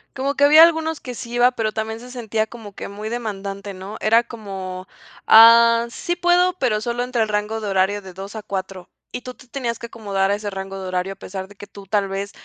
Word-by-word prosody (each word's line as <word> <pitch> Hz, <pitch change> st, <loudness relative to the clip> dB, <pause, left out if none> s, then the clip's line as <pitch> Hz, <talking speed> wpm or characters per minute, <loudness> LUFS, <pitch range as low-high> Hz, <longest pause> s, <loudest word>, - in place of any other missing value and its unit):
Como 275 Hz, +2 st, -1 dB
que 285 Hz, -, +1 dB
había 305 Hz, +3 st, +9 dB
algunos 320 Hz, -1 st, +2 dB
que 250 Hz, -1 st, -8 dB
sí 235 Hz, -, -8 dB
iba, 245 Hz, +1 st, +5 dB
pero 225 Hz, -3 st, -2 dB
también 220 Hz, +1 st, -4 dB
se 250 Hz, +1 st, -11 dB
sentía 225 Hz, -3 st, -2 dB
como 220 Hz, -3 st, -11 dB
que -, -, -7 dB
muy 210 Hz, +2 st, -7 dB
demandante, 200 Hz, -3 st, -5 dB
¿no? 190 Hz, +3 st, -8 dB
Era 225 Hz, +2 st, +4 dB
como: 190 Hz, -5 st, -7 dB, 0.4 s
"Ah, 230 Hz, +1 st, +7 dB
sí 345 Hz, +8 st, -3 dB
puedo, 355 Hz, +1 st, +3 dB
pero 215 Hz, -5 st, +1 dB
solo 240 Hz, +2 st, -2 dB
entre 250 Hz, -2 st, -1 dB
el 220 Hz, -, 0 dB
rango 210 Hz, +1 st, -2 dB
de 210 Hz, -, -3 dB
horario 195 Hz, +1 st, +1 dB
de 190 Hz, -1 st, -11 dB
2 195 Hz, +3 st, -9 dB
a 215 Hz, -, -6 dB
4". 190 Hz, -2 st, -6 dB, 0.2 s
Y 250 Hz, -, -4 dB
tú 255 Hz, -, -7 dB
te 255 Hz, -, -18 dB
tenías 240 Hz, -3 st, -3 dB
que 235 Hz, -, -8 dB
acomodar 200 Hz, -4 st, -1 dB
a -, -, +2 dB
ese 205 Hz, 0 st, -5 dB
rango 195 Hz, 0 st, -6 dB
de 190 Hz, -, -6 dB
horario 185 Hz, +1 st, -2 dB
a -, -, -19 dB
pesar 190 Hz, 0 st, -7 dB
de 205 Hz, -, -15 dB
que 205 Hz, -, -11 dB
tú 200 Hz, -1 st, -13 dB
tal 200 Hz, 0 st, 0 dB
vez 195 Hz, +1 st, -4 dB
215 Hz, 240 wpm, -21 LUFS, 195-240 Hz, 0.4 s, había